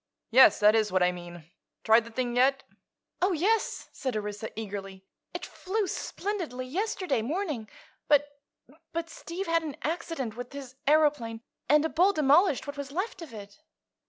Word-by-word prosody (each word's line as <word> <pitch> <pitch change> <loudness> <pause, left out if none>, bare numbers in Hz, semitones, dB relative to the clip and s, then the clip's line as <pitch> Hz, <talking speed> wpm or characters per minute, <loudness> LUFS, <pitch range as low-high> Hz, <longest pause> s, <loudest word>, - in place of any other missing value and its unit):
"Yes; 260 +3 +7
that 210 +1 +7
is 220 -2 +2
what 185 -1 +3
I 180 - +4
mean. 175 -1 -9 0.4
Tried 225 +1 +5
the 230 - -11
thing 245 0 -2
yet?" 270 +2 +3 0.6
"Oh, 370 +1 +3
yes," 415 +7 0
said 255 -5 -3
Orissa 210 +1 -4
eagerly. 195 -2 -7 0.3
"It - - -5
flew 410 +3 -2
splendidly 355 -10 -4
yesterday 365 - -1
morning, 290 - -3 0.4
but—but 290 +3 -2
Steve 360 +4 -6
had 330 -1 +2
an 305 -3 -6
accident 310 -7 -3
with 245 +2 -7
his 270 -3 -8
aëroplane, 290 -7 +2 0.3
and 300 +2 +5
a - - 0
bull 370 +5 +3
demolished 300 0 +4
what 285 0 -7
was 280 -1 -6
left 375 +4 -3
of 325 -6 -9
it." 205 -2 -11
275 Hz, 160 wpm, -28 LUFS, 225-330 Hz, 0.6 s, Yes